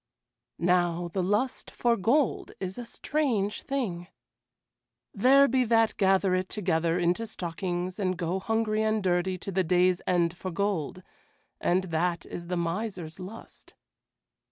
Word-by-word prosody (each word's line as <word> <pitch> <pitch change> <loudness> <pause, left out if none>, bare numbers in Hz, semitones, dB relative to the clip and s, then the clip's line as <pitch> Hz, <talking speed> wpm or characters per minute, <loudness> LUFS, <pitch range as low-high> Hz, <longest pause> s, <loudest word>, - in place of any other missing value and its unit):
Now 175 -1 +1
the 185 +3 -1
lust 210 +8 -1
for 240 -1 +1
gold 240 +7 +1
is 190 +3 -5
a 240 - -5
strange 230 -6 -1
thing. 195 -11 -3 1.1
There 270 +6 +6
be 255 0 +2
that 225 -1 +3
gather 190 -1 +3
it 185 0 0
together 170 -4 0
into 180 +6 0
stockings 180 0 -4
and 185 -2 0
go 175 +2 -1
hungry 220 +1 0
and 215 -1 +1
dirty 185 0 +1
to 195 - -6
the 190 0 +1
day's 180 +1 +3
end 175 -1 +2
for 185 - -5
gold, 185 -1 -2 0.6
and 180 +2 +2
that 170 +1 0
is 170 0 -7
the 180 0 -2
miser's 170 -1 -3
lust. 195 +5 -11
185 Hz, 140 wpm, -28 LUFS, 175-220 Hz, 1.1 s, There